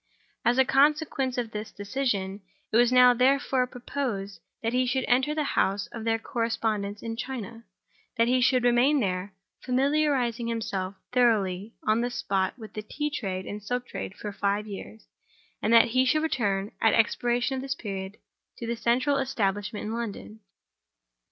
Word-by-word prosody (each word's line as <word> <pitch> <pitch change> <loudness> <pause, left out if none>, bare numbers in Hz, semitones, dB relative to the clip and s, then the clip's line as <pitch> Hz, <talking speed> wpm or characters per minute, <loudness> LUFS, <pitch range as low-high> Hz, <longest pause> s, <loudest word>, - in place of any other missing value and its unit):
As 240 +1 +3
a 265 - +5
consequence 280 -2 +2
of 235 -2 -2
this 210 0 -6
decision, 205 -3 -2 0.3
it - - -1
was 240 0 +5
now, 250 0 +7
therefore, 260 0 +2
proposed 240 -6 -4 0.2
that 230 +1 0
he 255 0 +2
should 260 +1 0
enter 260 +5 +2
the 310 - 0
house 200 +1 +1
of 230 -1 -7
their 225 0 +2
correspondents 220 -3 -2
in 225 0 -4
China; 230 -2 -6 0.5
that 230 0 +4
he 255 +1 +3
should 255 0 +3
remain 245 +5 +4
there, 190 -2 -2 0.3
familiarizing 260 -3 +1
himself 200 -5 -3 0.2
thoroughly 215 -4 +1
on 215 +2 +3
the 245 - 0
spot 195 -4 -1
with 220 -3 -10
the 215 - -4
tea 295 +7 -3
trade 190 -9 -3
and 210 +1 -6
the - - -22
silk 245 +2 -2
trade 190 - -6
for 210 - -6
five 200 +1 -1
years; 215 +1 -9 0.6
and 215 - +1
that 230 0 +7
he 255 +3 +3
should 310 +4 +2
return, 205 -9 0
at 225 - +4
the - - +3
expiration 240 +3 +1
of - - -3
this 270 0 -3
period, 195 -3 -6 0.4
to 235 - -6
the 235 +1 -2
central 255 +5 +1
establishment 210 -5 -1
in 215 - -3
London. 220 -1 -5
235 Hz, 170 wpm, -27 LUFS, 210-255 Hz, 0.6 s, now